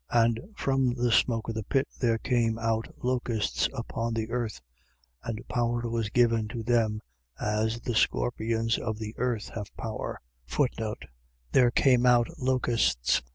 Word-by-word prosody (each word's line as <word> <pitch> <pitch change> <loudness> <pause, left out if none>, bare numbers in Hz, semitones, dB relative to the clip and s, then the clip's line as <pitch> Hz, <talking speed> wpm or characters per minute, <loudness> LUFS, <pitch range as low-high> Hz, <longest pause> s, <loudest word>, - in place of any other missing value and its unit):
9:3. 115 -1 +5
And 115 -1 -1 0.2
from 135 -2 +1
the 120 -1 +1
smoke 115 -1 +2
of 115 - -2
the 110 -1 -3
pit 135 +5 +1
there 115 -3 +2
came 115 -2 +1
out 115 0 0 0.2
locusts 120 -3 0
upon 115 -2 -3
the 110 0 -2
earth. 120 - -2 0.6
And 115 0 -5
power 120 -1 0
was 115 -2 -1
given 115 -1 +3
to 115 +1 -5
them, 110 -2 +1 0.4
as 110 +2 0
the 120 - -2
scorpions 115 0 +1
of 110 -1 -3
the 110 0 -5
earth 120 -3 -1
have 105 -3 -6
power. 110 -1 -4 1.3
There 125 -2 +5
came 125 0 +4
out 120 -1 +5
locusts. 120 - +2
115 Hz, 150 wpm, -28 LUFS, 110-120 Hz, 1.3 s, 9:3